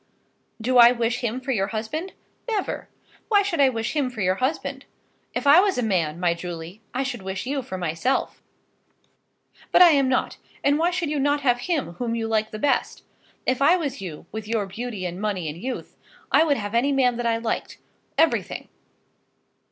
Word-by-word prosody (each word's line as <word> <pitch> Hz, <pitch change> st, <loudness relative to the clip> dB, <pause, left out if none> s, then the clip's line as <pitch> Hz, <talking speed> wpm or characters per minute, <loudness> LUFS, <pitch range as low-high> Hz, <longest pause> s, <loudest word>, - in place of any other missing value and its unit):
Do 250 Hz, +3 st, +3 dB
I 235 Hz, 0 st, +9 dB
wish 240 Hz, 0 st, 0 dB
him 240 Hz, 0 st, -2 dB
for 260 Hz, +1 st, -3 dB
your 195 Hz, -6 st, +1 dB
husband? 230 Hz, -, -4 dB, 0.4 s
Never! 420 Hz, -4 st, -2 dB, 0.4 s
Why 410 Hz, -2 st, +4 dB
should 370 Hz, -6 st, -2 dB
I 275 Hz, -2 st, +6 dB
wish 225 Hz, +2 st, -3 dB
him 285 Hz, -4 st, +1 dB
for 235 Hz, -4 st, -6 dB
your 185 Hz, 0 st, +2 dB
husband? 265 Hz, +5 st, -2 dB, 0.5 s
If -, -, -2 dB
I 285 Hz, +4 st, +8 dB
was 390 Hz, -4 st, +2 dB
a 250 Hz, -, 0 dB
man, 170 Hz, -7 st, 0 dB
my 175 Hz, -1 st, +2 dB
Julie, 170 Hz, +3 st, -7 dB
I 260 Hz, +2 st, -1 dB
should 250 Hz, -5 st, -4 dB
wish 190 Hz, +2 st, -4 dB
you 275 Hz, +1 st, -1 dB
for 190 Hz, -7 st, -6 dB
myself. 175 Hz, +9 st, -1 dB, 1.3 s
But -, -, +8 dB
I 345 Hz, -, +8 dB
am 275 Hz, -3 st, +3 dB
not, 260 Hz, -, 0 dB, 0.3 s
and 285 Hz, +2 st, +3 dB
why 335 Hz, +2 st, +3 dB
should 350 Hz, -4 st, -2 dB
you 300 Hz, -, 0 dB
not 285 Hz, +1 st, +1 dB
have 245 Hz, -3 st, +2 dB
him 310 Hz, -, 0 dB
whom 235 Hz, -2 st, -1 dB
you 225 Hz, -1 st, -2 dB
like 220 Hz, -1 st, 0 dB
the 215 Hz, -, -6 dB
best? 280 Hz, +6 st, 0 dB, 0.4 s
If 255 Hz, +1 st, 0 dB
I 310 Hz, +6 st, +6 dB
was 280 Hz, -, -4 dB
you, 170 Hz, -4 st, -7 dB
with 220 Hz, -1 st, -6 dB
your 220 Hz, -2 st, 0 dB
beauty 210 Hz, 0 st, -5 dB
and 180 Hz, +2 st, -5 dB
money 200 Hz, -6 st, -2 dB
and 155 Hz, +3 st, -6 dB
youth, 260 Hz, +2 st, -5 dB, 0.4 s
I 320 Hz, -, +5 dB
would 285 Hz, -3 st, +2 dB
have 205 Hz, 0 st, -5 dB
any 245 Hz, +5 st, +2 dB
man 250 Hz, -3 st, +2 dB
that 240 Hz, -1 st, -1 dB
I 230 Hz, 0 st, +2 dB
liked, 230 Hz, 0 st, -3 dB, 0.4 s
everything. 325 Hz, 0 st, +1 dB
245 Hz, 200 wpm, -24 LUFS, 205-280 Hz, 1.3 s, I